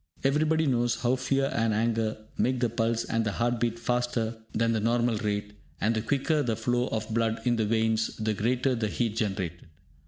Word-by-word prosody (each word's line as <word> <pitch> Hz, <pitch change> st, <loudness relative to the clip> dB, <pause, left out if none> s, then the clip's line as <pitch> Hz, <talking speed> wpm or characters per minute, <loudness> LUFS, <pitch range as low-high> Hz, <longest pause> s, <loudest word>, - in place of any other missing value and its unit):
Everybody 155 Hz, +3 st, +2 dB
knows 120 Hz, -3 st, +1 dB
how 125 Hz, +1 st, +3 dB
fear 135 Hz, +1 st, 0 dB
and 115 Hz, -2 st, +1 dB
anger 110 Hz, 0 st, 0 dB, 0.2 s
make 130 Hz, 0 st, +1 dB
the 120 Hz, -1 st, +1 dB
pulse 115 Hz, 0 st, 0 dB
and 115 Hz, 0 st, 0 dB
the 105 Hz, -2 st, -1 dB
heart 120 Hz, +2 st, 0 dB
beat 115 Hz, -1 st, 0 dB
faster 120 Hz, -1 st, -1 dB, 0.2 s
than 115 Hz, +1 st, +1 dB
the 110 Hz, -, +1 dB
normal 115 Hz, +1 st, +1 dB
rate, 105 Hz, 0 st, -2 dB, 0.3 s
and 110 Hz, +4 st, +2 dB
the 110 Hz, -, 0 dB
quicker 145 Hz, +6 st, +1 dB
the 115 Hz, -5 st, 0 dB
flow 120 Hz, +3 st, 0 dB
of 110 Hz, 0 st, -3 dB
blood 115 Hz, -1 st, +1 dB
in 120 Hz, -1 st, +3 dB
the 110 Hz, -2 st, +1 dB
veins, 110 Hz, 0 st, +1 dB
the 110 Hz, -1 st, 0 dB
greater 125 Hz, +5 st, +1 dB
the 115 Hz, -3 st, -1 dB
heat 110 Hz, 0 st, -1 dB
generated. 95 Hz, -6 st, -2 dB
115 Hz, 195 wpm, -28 LUFS, 110-120 Hz, 0.3 s, how